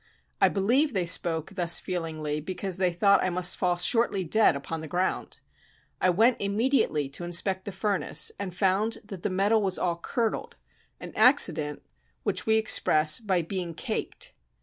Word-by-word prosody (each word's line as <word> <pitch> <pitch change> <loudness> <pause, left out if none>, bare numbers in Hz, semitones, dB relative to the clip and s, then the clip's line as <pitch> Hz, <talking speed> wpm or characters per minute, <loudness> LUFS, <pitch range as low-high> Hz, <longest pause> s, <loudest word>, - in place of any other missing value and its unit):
I - - +6
believe 245 +9 +1
they 185 -3 0
spoke 170 -2 +1
thus 175 -3 +2
feelingly 155 -4 -4
because 185 +2 -4
they 185 -1 +1
thought 200 +3 +3
I 185 - +1
must 180 0 0
fall 180 -1 0
shortly 200 +1 +1
dead 195 -1 +3
upon 155 +3 -5
the 160 - -7
ground. 180 +4 -3 0.6
I 185 - +3
went 225 +7 +3
immediately 200 - 0
to 140 - -6
inspect 185 +2 0
the 200 - -5
furnace, 195 0 -1
and 200 -2 -4
found 195 +5 0
that 195 -4 -9
the - - -2
metal 200 +4 +2
was 190 -2 0
all 170 -2 -1
curdled; 230 +4 -3 0.4
an - - -9
accident 160 - +3 0.4
which - - -2
we 220 - +4
express 155 -8 +3
by 190 -6 0
"being 175 -1 -5
caked." - - -4
185 Hz, 165 wpm, -26 LUFS, 170-205 Hz, 0.6 s, I